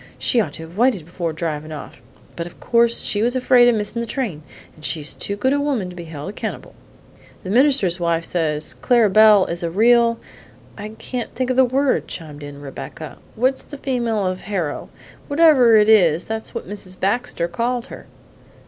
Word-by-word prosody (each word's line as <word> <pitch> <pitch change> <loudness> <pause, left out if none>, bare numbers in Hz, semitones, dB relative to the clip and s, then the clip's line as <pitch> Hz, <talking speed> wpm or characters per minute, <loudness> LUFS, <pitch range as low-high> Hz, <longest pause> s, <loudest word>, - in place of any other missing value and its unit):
She'd 240 - +2
ought 155 -8 -4
to 160 - -8
have 165 +3 -12
waited 235 -10 +2
before 170 0 -4
drivin' 155 -1 -4
off; 145 -3 -9 0.3
but 170 0 -5
of 175 - -15
course 235 0 +2
she 205 - +2
was 240 +3 +1
afraid 250 -1 +5
of 240 - +2
missing 210 +2 -2
the 235 - -3
train, 220 - -3 0.3
and 155 - -18
she's 155 -3 -2
too 200 - -4
good 260 +7 +1
a 285 - +1
woman 260 -11 -1
to - - -12
be 170 -1 -8
held 155 -1 -8
accountable." 200 - -6 0.7
"The 185 - -5
minister's 240 - +3
wife 170 -1 0
says 155 -3 -1
Clara 235 -5 +2
Belle 215 -2 +6
is 170 0 -3
a 170 - -2
real 230 +5 +3 0.6
I 210 0 -7
can't 250 -2 -5
think 255 0 -1
of - - -1
the 260 - +6
word!" 265 +2 0
chimed 150 -3 -8
in 145 0 -9
Rebecca. 145 +2 -9 0.2
"What's 260 +4 +1
the 290 - -10
female 235 -7 -1
of 185 0 -2
hero? 180 -7 -4 0.4
Whatever 285 -7 +5
it 210 0 +4
is, 175 -7 +4
that's 220 0 -6
what - - -5
Mrs. 185 -2 -9
Baxter 200 -4 -1
called 235 +7 -2
her!" - - -11
210 Hz, 195 wpm, -20 LUFS, 170-245 Hz, 0.7 s, Belle